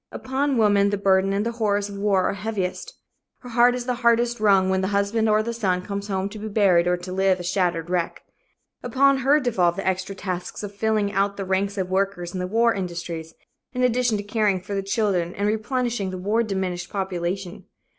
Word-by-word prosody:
Upon 270 +1 -1
woman 205 -2 +4
the 205 - -1
burden 195 0 +2
and 200 +2 0
the 235 - -1
horrors 205 -3 0
of 200 - -8
war 200 -2 +1
are - - -1
heaviest. 200 -2 -4 0.4
Her 250 - -10
heart 245 +1 +4
is 245 -1 -4
the 250 - 0
hardest 235 0 +2
wrung 195 -3 +4
when 190 0 +1
the 190 - 0
husband 205 +3 +1
or 215 0 +3
the 235 +1 -3
son 185 -6 -1
comes 200 +1 -5
home 190 -1 -1
to 215 +1 -9
be 215 - -5
buried 195 -5 +3
or 180 0 +2
to 180 +1 -8
live 190 0 +2
a - - -5
shattered 175 -2 0
wreck. 175 -1 -2 0.6
Upon 270 +3 +3
her 275 +3 +4
devolve 185 - +1
the 195 - -5
extra 190 +1 -1
tasks 185 +1 -5
of 205 -1 -6
filling 210 -1 0
out 200 +1 0
the 195 - -4
ranks 195 +2 -1
of 185 -1 -2
workers 190 -2 -1
in 185 - -3
the 180 - -2
war 230 +4 +3
industries, 170 -3 -5 0.4
in 250 0 -1
addition 245 -2 +2
to 205 - -4
caring 205 -2 +1
for 185 +3 -7
the 195 - 0
children 195 -4 -1
and 200 +1 -1
replenishing 225 -1 -1
the 185 - -5
war 205 +5 +1
diminished 190 -5 -3
population. 185 -1 -4
200 Hz, 215 wpm, -23 LUFS, 185-220 Hz, 0.6 s, woman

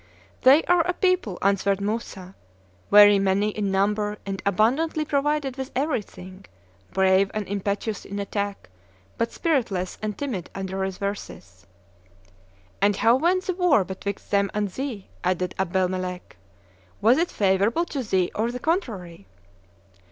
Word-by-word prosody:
"They 275 +5 +6
are 355 -1 +3
a 360 - +1
people," 365 - 0
answered 200 0 +2
Moussa, 200 -3 -4 0.6
"very 205 -1 +8
many 195 +2 +1
in 210 -1 -2
number 210 +2 0
and 195 -1 -4
abundantly 270 - +1
provided 285 -2 0
with 265 0 -4
everything, 205 - -4 0.5
brave 190 +1 +3
and 215 -2 -3
impetuous 200 +2 -3
in 200 - -7
attack, 200 - -3 0.5
but 230 - 0
spiritless 230 - -1
and 215 -1 -3
timid 240 - -4
under 190 -1 -4
reverses." 190 - -5 1.1
"And 200 0 +3
how 230 +4 +4
went 350 +7 +1
the 370 - -2
war 350 - +3
betwixt 190 +2 -6
them 200 -1 +2
and 210 -1 0
thee?" 240 -2 -5 0.2
added 180 0 0
Abdelmelek: 185 0 -2 0.6
"was 235 +7 +4
it 340 - +1
favorable 200 - +1
to 285 -5 -4
thee 190 -6 0
or 225 +3 -1
the 250 - -5
contrary?" 215 - -3
205 Hz, 135 wpm, -24 LUFS, 190-260 Hz, 1.1 s, very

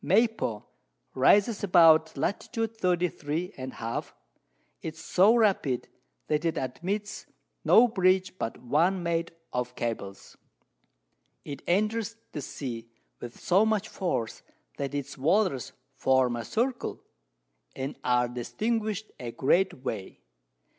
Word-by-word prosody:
Maypo 205 - +1 0.5
rises 205 - +4
about 165 -4 +6
Lat. 200 - -2
33 180 - -1
and 130 0 -6
a - - -14
half. 115 +1 -4 0.7
It 160 -1 -5
is - - -14
so 190 +7 +4
rapid, 195 - +1 0.4
that 150 +1 0
it 165 -1 0
admits 185 +11 -3 0.4
no 240 +2 +7
Bridge 185 -4 +2
but 115 - -3
one 170 +9 +1
made 170 0 -1 0.2
of 125 0 -2
Cables; 110 -4 -5 1.1
it 140 -2 -6
enters 215 +5 +1 0.2
the 150 - -5
Sea 120 -4 -6 0.3
with 120 -1 -9
so 190 +4 +4
much 215 -1 0
Force, 150 - -2 0.4
that 140 0 -3
its 140 -1 -5
Waters 165 - +1 0.2
form 130 -2 +2
a 120 -1 -5
Circle, 245 +2 -2 0.7
and 135 +2 -4
are 125 0 +3
distinguished 215 - -2
a 120 - -5
great 170 +2 +1
Way. 95 - -4
165 Hz, 120 wpm, -28 LUFS, 130-205 Hz, 1.1 s, no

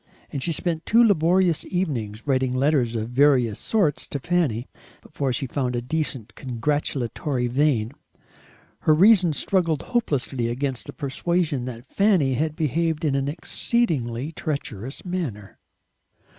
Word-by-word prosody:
And 140 - -4
she 170 - +1
spent 165 +1 -2
two 230 +2 +6
laborious 180 -4 +3
evenings 120 - -3
writing 130 -2 +1
letters 130 -3 +2
of 110 0 -2
various 125 -5 +3
sorts 195 -10 +1
to - - -3
Fanny, 140 -6 0 0.4
before 140 -3 -2
she 130 +3 -2
found 125 -1 -2
a 120 - -1
decent 130 -6 -3
congratulatory 130 0 -2
vein. 125 -3 +1 0.9
Her 155 - +3
reason 185 -1 +6
struggled 165 0 +1
hopelessly 140 - -1
against 130 +1 -3
the - - -7
persuasion 150 -1 -1
that 120 0 -8
Fanny 185 -10 +2
had 155 +4 -1
behaved 160 +1 0
in 145 - +1
an 135 0 0
exceedingly 150 - 0
treacherous 135 - -5
manner. 150 - -5
145 Hz, 130 wpm, -24 LUFS, 125-165 Hz, 0.9 s, two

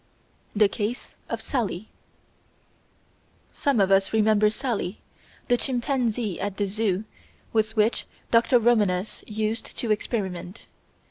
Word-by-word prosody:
The 210 0 +6
Case 210 +4 -4 0.2
of - - -3
Sally 220 -6 -2 1.6
Some 280 -5 +1
of 195 -1 +3
us 195 0 +4
remember 215 -1 +4
Sally, 220 -4 -2 0.5
the 245 - +3
chimpanzee 245 - -1
at 200 -1 -3
the 205 - +1
"Zoo" 200 -1 0 0.5
with 220 0 +1
which 220 +1 +2 0.2
Dr. 235 +2 +5
Romanes 215 -5 +1
used 215 +1 -3
to 230 - 0
experiment. 195 -3 -3
215 Hz, 115 wpm, -25 LUFS, 200-235 Hz, 1.6 s, The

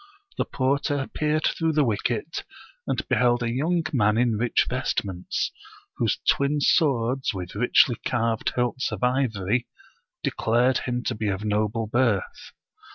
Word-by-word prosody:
The - - +2
porter 140 +1 0
peered 155 +1 0
through 160 -1 +1
the 150 -1 +3
wicket, 115 +4 -2 0.4
and - - -2
beheld 120 -1 +2
a 115 - -1
young 165 +7 0
man 105 -4 +3
in 120 -2 +2
rich 120 +3 +2
vestments, 90 -3 -2 0.5
whose - - +1
twin 140 +2 +2
swords 130 - +2
with 90 -2 -6
richly 120 +2 +3
carved 115 -6 0
hilts 125 0 -1
of 110 -1 -5
ivory 120 -3 0 0.6
declared 120 +3 +2
him 125 -1 -3
to 125 - -1
be 110 -1 -3
of 100 +1 -2
noble 105 +2 0
birth. 115 -3 -1
120 Hz, 140 wpm, -25 LUFS, 110-135 Hz, 0.6 s, the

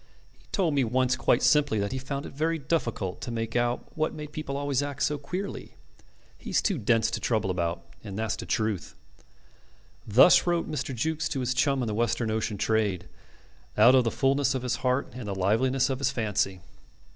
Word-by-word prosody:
He - - -27
told 180 -7 +1
me 140 -2 +2
once 125 +2 +1
quite - - +2
simply 145 -7 +3
that 100 +1 -1
he 130 - -3
found 140 +1 -5
it - - -8
very 160 +3 0
difficult 130 - -2
to - - -5
make 115 -1 -4
out 120 0 -1
what 155 0 -1
made 150 -1 -7
people 150 -3 -4
always 140 -1 0
act 145 -1 -3
so 150 -1 0
queerly. 180 +8 -6 0.6
He's - - 0
too 195 -8 0
dense 115 0 +2
to - - -2
trouble 110 -5 0
about, 85 -2 -2 0.2
and 100 -1 -7
that's 110 0 -1
the - - -8
truth." 110 -5 -2 1.1
Thus 125 - +6
wrote 175 -1 +1
Mr. 140 -3 -3
Jukes 160 +5 -1
to 135 - -2
his 125 +1 0
chum 135 0 +1
in - - -2
the 110 - -2
Western 115 0 0
ocean 110 -1 -2
trade, 105 -3 0 0.7
out 115 +4 +7
of 130 -1 +5
the 115 - +1
fulness 135 +1 +1
of 130 - -3
his 125 - -1
heart 130 +1 0
and 125 -3 -7
the 100 - -3
liveliness 125 +7 +2
of 130 - -2
his 140 -1 +1
fancy. 105 -7 -1
125 Hz, 200 wpm, -27 LUFS, 110-145 Hz, 1.1 s, out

